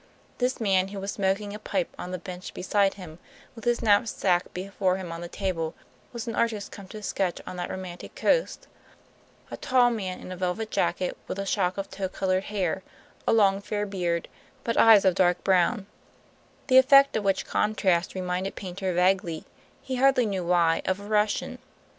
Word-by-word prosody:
This 250 Hz, 0 st, 0 dB
man, 190 Hz, -4 st, +2 dB
who 195 Hz, 0 st, -7 dB
was 195 Hz, +1 st, -3 dB
smoking 200 Hz, +1 st, -1 dB
a 210 Hz, -, -7 dB
pipe 195 Hz, -4 st, -2 dB
on 180 Hz, -, -5 dB
the 185 Hz, -, -3 dB
bench 180 Hz, +1 st, -8 dB
beside 195 Hz, +1 st, +1 dB
him, 175 Hz, -4 st, -11 dB, 0.3 s
with 230 Hz, -1 st, -12 dB
his 240 Hz, 0 st, +1 dB
knapsack 205 Hz, -4 st, +2 dB
before 190 Hz, 0 st, -1 dB
him 185 Hz, -3 st, -6 dB
on 165 Hz, 0 st, -6 dB
the 175 Hz, -, -5 dB
table, 170 Hz, -4 st, -3 dB, 0.4 s
was 235 Hz, -2 st, -5 dB
an 230 Hz, -, -2 dB
artist 220 Hz, -3 st, -1 dB
come 200 Hz, -2 st, -10 dB
to 215 Hz, +2 st, -9 dB
sketch 190 Hz, -3 st, -1 dB
on -, -, -7 dB
that 175 Hz, -, -4 dB
romantic 185 Hz, -2 st, -7 dB
coast; -, -, +1 dB, 0.9 s
a -, -, -5 dB
tall 250 Hz, -2 st, +3 dB
man 190 Hz, -5 st, -4 dB
in -, -, -9 dB
a -, -, -4 dB
velvet 185 Hz, +5 st, -2 dB
jacket, 180 Hz, -, 0 dB
with -, -, -4 dB
a 195 Hz, -, -3 dB
shock 190 Hz, -2 st, 0 dB
of 195 Hz, -, -3 dB
tow 190 Hz, -1 st, -3 dB
colored 185 Hz, 0 st, -1 dB
hair, 190 Hz, -3 st, -1 dB, 0.5 s
a -, -, +4 dB
long 200 Hz, -3 st, +4 dB
fair 205 Hz, +1 st, -2 dB
beard, 175 Hz, -4 st, -2 dB, 0.4 s
but 230 Hz, -, -1 dB
eyes 220 Hz, -3 st, +7 dB
of 190 Hz, -, +5 dB
dark 180 Hz, -1 st, +2 dB
brown, 190 Hz, +3 st, +2 dB, 0.8 s
the 260 Hz, -1 st, +7 dB
effect 275 Hz, +1 st, +6 dB
of 220 Hz, -, 0 dB
which 195 Hz, -1 st, +1 dB
contrast 190 Hz, -5 st, +1 dB
reminded 185 Hz, +1 st, -2 dB
Paynter 190 Hz, 0 st, -4 dB
vaguely, 180 Hz, -2 st, +1 dB, 0.4 s
he 260 Hz, -1 st, -3 dB
hardly 265 Hz, -1 st, +4 dB
knew 195 Hz, -4 st, -2 dB
why, 170 Hz, -2 st, +2 dB
of 185 Hz, +1 st, 0 dB
a 200 Hz, -, -10 dB
Russian. 210 Hz, 0 st, 0 dB
195 Hz, 185 wpm, -26 LUFS, 180-210 Hz, 0.9 s, eyes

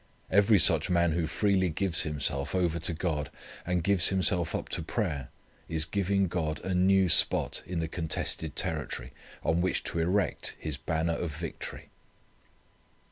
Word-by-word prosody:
Every 100 Hz, +2 st, +5 dB
such 80 Hz, -3 st, +5 dB
man 85 Hz, -1 st, +2 dB
who 80 Hz, 0 st, -1 dB
freely 95 Hz, +1 st, +1 dB
gives 85 Hz, +1 st, +1 dB
himself 75 Hz, 0 st, -2 dB
over 85 Hz, -2 st, 0 dB
to 85 Hz, +1 st, 0 dB
God, 80 Hz, -4 st, -2 dB, 0.4 s
and 90 Hz, -1 st, 0 dB
gives 95 Hz, -2 st, +5 dB
himself 95 Hz, -3 st, +1 dB
up -, -, -4 dB
to 85 Hz, -, -2 dB
prayer 80 Hz, -, -3 dB, 0.4 s
is 80 Hz, -2 st, +2 dB
giving 100 Hz, +1 st, 0 dB
God 80 Hz, -3 st, -2 dB
a 95 Hz, -, -1 dB
new 95 Hz, +1 st, +4 dB
spot 85 Hz, -, +3 dB
in 90 Hz, -2 st, -3 dB
the 80 Hz, -, -2 dB
contested 80 Hz, -1 st, -2 dB
territory 75 Hz, -4 st, -3 dB, 0.3 s
on 80 Hz, +2 st, +1 dB
which 95 Hz, 0 st, 0 dB
to 85 Hz, -, -3 dB
erect 95 Hz, +4 st, 0 dB
His 80 Hz, -2 st, -3 dB
banner 80 Hz, +3 st, -1 dB
of 80 Hz, -3 st, -4 dB
victory. 85 Hz, 0 st, -7 dB
85 Hz, 155 wpm, -29 LUFS, 80-95 Hz, 0.4 s, Every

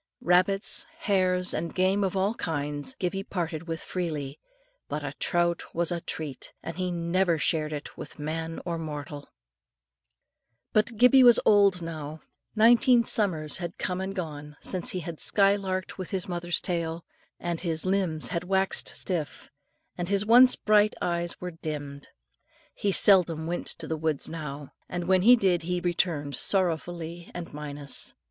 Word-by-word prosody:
Rabbits, 185 Hz, +3 st, +2 dB
hares, 185 Hz, -2 st, +3 dB
and 165 Hz, +1 st, -4 dB
game 190 Hz, +2 st, +2 dB
of 190 Hz, 0 st, -1 dB
all 195 Hz, +3 st, +1 dB
kinds, 145 Hz, -, -3 dB
Gibbie 195 Hz, -4 st, -2 dB
parted 170 Hz, -4 st, -4 dB
with 165 Hz, 0 st, -4 dB
freely; 150 Hz, -6 st, -4 dB, 0.5 s
but -, -, -3 dB
a -, -, -4 dB
trout 175 Hz, -1 st, +1 dB
was 170 Hz, 0 st, 0 dB
a 170 Hz, -1 st, -2 dB
treat, 150 Hz, -5 st, -6 dB
and 165 Hz, -, -6 dB
he 185 Hz, -1 st, -1 dB
never 170 Hz, 0 st, +1 dB
shared 155 Hz, 0 st, 0 dB
it 150 Hz, -1 st, -6 dB
with -, -, -9 dB
man 160 Hz, +2 st, -4 dB
or 170 Hz, -2 st, -3 dB
mortal. 150 Hz, -2 st, -7 dB, 1.4 s
But 220 Hz, +1 st, +1 dB
Gibbie 250 Hz, +3 st, +7 dB
was 240 Hz, -2 st, +8 dB
now -, -, +6 dB
old. 200 Hz, -4 st, +4 dB, 0.7 s
Nineteen 235 Hz, +2 st, +5 dB
summers 160 Hz, -8 st, 0 dB
had 175 Hz, -1 st, -6 dB
come 185 Hz, 0 st, -2 dB
and 195 Hz, +1 st, -4 dB
gone 150 Hz, -5 st, -6 dB
since 185 Hz, -2 st, -2 dB
he 185 Hz, -, -4 dB
had 165 Hz, -1 st, -7 dB
sky 200 Hz, -1 st, +3 dB
larked 190 Hz, -2 st, -4 dB
with 185 Hz, -, -4 dB
his 190 Hz, -3 st, -2 dB
mother's 175 Hz, -1 st, -1 dB
tail, 170 Hz, -2 st, -3 dB, 0.3 s
and 170 Hz, -1 st, -3 dB
his 165 Hz, -2 st, -1 dB
limbs 185 Hz, -5 st, 0 dB
had 170 Hz, -1 st, -2 dB
waxed 190 Hz, +1 st, 0 dB
stiff, 165 Hz, -6 st, -4 dB, 0.5 s
and 175 Hz, +1 st, -2 dB
his 200 Hz, 0 st, +1 dB
once 250 Hz, +3 st, +7 dB
bright 210 Hz, 0 st, +3 dB
eyes 170 Hz, 0 st, -2 dB
were 180 Hz, 0 st, -5 dB
dimmed. 145 Hz, -3 st, -7 dB, 0.7 s
He 200 Hz, -, -1 dB
seldom 175 Hz, -5 st, +4 dB
went 175 Hz, +2 st, -3 dB
to 165 Hz, -, +3 dB
the 160 Hz, -, -2 dB
woods 155 Hz, -2 st, -1 dB
now, 150 Hz, -3 st, -7 dB, 0.2 s
and 175 Hz, -1 st, -4 dB
when 185 Hz, -1 st, +4 dB
he 240 Hz, +6 st, +8 dB
did 185 Hz, -6 st, +1 dB
he 180 Hz, +2 st, -2 dB
returned 170 Hz, -5 st, -1 dB
sorrowfully 170 Hz, -2 st, 0 dB
and 175 Hz, -3 st, -7 dB
minus. 145 Hz, -1 st, -3 dB
175 Hz, 160 wpm, -27 LUFS, 160-190 Hz, 1.4 s, was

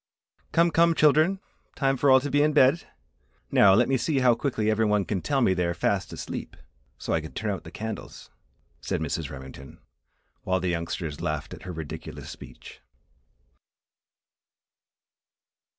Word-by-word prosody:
"Come, 170 Hz, +1 st, +3 dB
come, 165 Hz, 0 st, +4 dB
children! 155 Hz, +6 st, +4 dB, 0.4 s
time 135 Hz, -1 st, +1 dB
for 140 Hz, +2 st, +2 dB
all 130 Hz, 0 st, +7 dB
to 145 Hz, +1 st, -4 dB
be 145 Hz, -, +3 dB
in 150 Hz, +1 st, +2 dB
bed! 145 Hz, +3 st, +4 dB, 0.6 s
Now, 95 Hz, -2 st, +6 dB
let 120 Hz, +3 st, +3 dB
me 135 Hz, -, +2 dB
see 140 Hz, +4 st, -1 dB
how 125 Hz, -2 st, +5 dB
quickly 115 Hz, -3 st, -2 dB
every 110 Hz, +1 st, +1 dB
one 105 Hz, -2 st, +2 dB
can 95 Hz, -4 st, -2 dB
tell 135 Hz, -, 0 dB
me 95 Hz, -, +3 dB
they 90 Hz, -1 st, 0 dB
are 85 Hz, -, -2 dB
fast -, -, -1 dB
asleep, -, -, -7 dB, 0.4 s
so -, -, -3 dB
I 80 Hz, -, +1 dB
can 80 Hz, -, -10 dB
turn 105 Hz, 0 st, -2 dB
out 95 Hz, -, -5 dB
the -, -, -8 dB
candles," 110 Hz, 0 st, -7 dB, 0.5 s
said -, -, -2 dB
Mrs. 80 Hz, -1 st, -3 dB
Remington, 65 Hz, 0 st, -11 dB, 0.6 s
while 95 Hz, 0 st, 0 dB
the 90 Hz, 0 st, -2 dB
youngsters 85 Hz, -3 st, -4 dB
laughed -, -, -3 dB
at -, -, -10 dB
her -, -, -3 dB
ridiculous 80 Hz, -3 st, -8 dB
speech. 60 Hz, -, -12 dB
110 Hz, 165 wpm, -26 LUFS, 85-140 Hz, 0.6 s, all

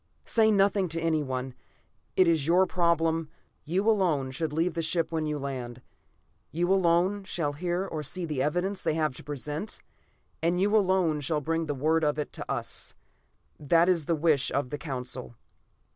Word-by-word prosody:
"Say 220 Hz, -1 st, +3 dB
nothing 200 Hz, -2 st, +3 dB
to 165 Hz, +1 st, -2 dB
anyone. 135 Hz, -6 st, -1 dB, 0.6 s
It 185 Hz, -, +5 dB
is 160 Hz, -3 st, +2 dB
your 180 Hz, +3 st, +5 dB
problem. 165 Hz, -3 st, +1 dB, 0.4 s
You 185 Hz, +7 st, 0 dB
alone 170 Hz, -11 st, +2 dB
should 155 Hz, +3 st, -2 dB
leave 165 Hz, +3 st, 0 dB
the 165 Hz, -, -2 dB
ship 165 Hz, +1 st, 0 dB
when 160 Hz, -1 st, -1 dB
you 150 Hz, 0 st, -1 dB
land; 130 Hz, -4 st, -5 dB, 0.7 s
you 175 Hz, +4 st, +1 dB
alone 185 Hz, +2 st, +2 dB
shall 165 Hz, -6 st, -2 dB
hear 175 Hz, +4 st, -2 dB
or 160 Hz, -5 st, -4 dB
see 175 Hz, +5 st, -3 dB
the 150 Hz, -5 st, -2 dB
evidence 180 Hz, +7 st, -1 dB
they 155 Hz, -, 0 dB
have 155 Hz, -3 st, 0 dB
to -, -, -10 dB
present, 150 Hz, -, -5 dB, 0.6 s
and 170 Hz, +2 st, +1 dB
you 205 Hz, +3 st, +2 dB
alone 185 Hz, -6 st, +3 dB
shall 150 Hz, +2 st, -1 dB
bring 165 Hz, +2 st, -1 dB
word 155 Hz, +3 st, +1 dB
of 150 Hz, 0 st, +1 dB
it 150 Hz, -, -4 dB
to -, -, -5 dB
us. -, -, -4 dB, 0.6 s
That 165 Hz, +4 st, +3 dB
is 170 Hz, -5 st, +2 dB
the 165 Hz, -, +1 dB
wish 150 Hz, -3 st, +2 dB
of 135 Hz, -2 st, -1 dB
the 145 Hz, -, -4 dB
Council." 125 Hz, -4 st, -5 dB
165 Hz, 175 wpm, -28 LUFS, 145-180 Hz, 0.7 s, It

